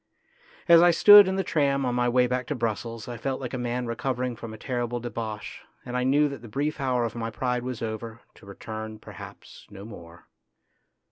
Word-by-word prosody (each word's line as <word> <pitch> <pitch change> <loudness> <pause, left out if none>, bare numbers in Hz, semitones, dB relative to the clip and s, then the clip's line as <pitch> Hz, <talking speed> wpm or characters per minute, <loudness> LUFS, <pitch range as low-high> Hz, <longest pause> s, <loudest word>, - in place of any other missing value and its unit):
As 170 -1 +8
I 175 - +6
stood 205 +3 +8
in 190 - -1
the 195 - 0
tram 140 -5 +1
on 125 - -1
my 120 0 +1
way 125 +1 +3
back 125 0 -2
to 150 - -2
Brussels 115 -1 -4
I 120 -1 -6
felt 130 +3 -3
like 130 -2 -6
a - - -2
man 125 +1 -2
recovering 125 +1 -3
from 115 0 -8
a 110 - -9
terrible 120 0 -3
debauch, 115 -3 -6 0.2
and 125 0 -6
I 125 - 0
knew 145 +3 +3
that 140 -5 -7
the 120 - -11
brief 145 +7 -3
hour 125 -2 0
of 115 - -4
my 115 -1 -4
pride 125 +2 -2
was 125 -2 -5
over, 115 +1 -6
to - - -18
return, 110 +2 -7
perhaps, - - -12
no 100 -1 -11
more. 85 -6 -12
120 Hz, 210 wpm, -26 LUFS, 115-130 Hz, 0.2 s, As